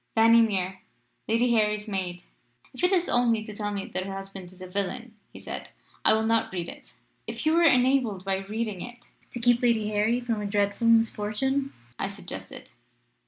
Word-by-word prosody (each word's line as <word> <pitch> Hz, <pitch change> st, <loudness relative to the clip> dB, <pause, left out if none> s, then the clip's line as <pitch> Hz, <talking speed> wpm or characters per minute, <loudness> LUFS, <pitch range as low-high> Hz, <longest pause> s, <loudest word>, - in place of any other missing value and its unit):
"'Fanny 230 Hz, +1 st, +7 dB
Mere, 190 Hz, -4 st, 0 dB, 0.5 s
Lady 235 Hz, +2 st, +2 dB
Harry's 210 Hz, -1 st, +1 dB
maid.' 180 Hz, -3 st, -3 dB, 0.5 s
"'If 255 Hz, -, -8 dB
it 360 Hz, +1 st, +3 dB
is 360 Hz, -2 st, +2 dB
only 235 Hz, -3 st, +2 dB
to 215 Hz, -1 st, -8 dB
tell 205 Hz, 0 st, -3 dB
me 200 Hz, -1 st, -3 dB
that 185 Hz, +1 st, -3 dB
her 195 Hz, -, -5 dB
husband 195 Hz, -2 st, -8 dB
is 185 Hz, -, -16 dB
a 185 Hz, -, -7 dB
villain,' 200 Hz, +5 st, -4 dB, 0.2 s
he -, -, -11 dB
said, -, -, -7 dB, 0.3 s
'I -, -, +5 dB
will 220 Hz, 0 st, +1 dB
not 225 Hz, 0 st, +1 dB
read 175 Hz, -2 st, -3 dB
it.' -, -, -11 dB, 0.3 s
"'If -, -, -5 dB
you 310 Hz, -, +4 dB
were 335 Hz, -, +4 dB
enabled 250 Hz, -, +3 dB
by 195 Hz, 0 st, 0 dB
reading 210 Hz, 0 st, -4 dB
it 240 Hz, 0 st, -9 dB, 0.2 s
to 240 Hz, -, -6 dB
keep 240 Hz, 0 st, +3 dB
Lady 230 Hz, -3 st, +2 dB
Harry 215 Hz, +3 st, +1 dB
from 230 Hz, -3 st, -2 dB
a 205 Hz, -, -2 dB
dreadful 205 Hz, +2 st, 0 dB
misfortune?' 230 Hz, +4 st, +2 dB, 0.3 s
I -, -, 0 dB
suggested. 200 Hz, +1 st, -8 dB
220 Hz, 190 wpm, -27 LUFS, 195-240 Hz, 0.5 s, Fanny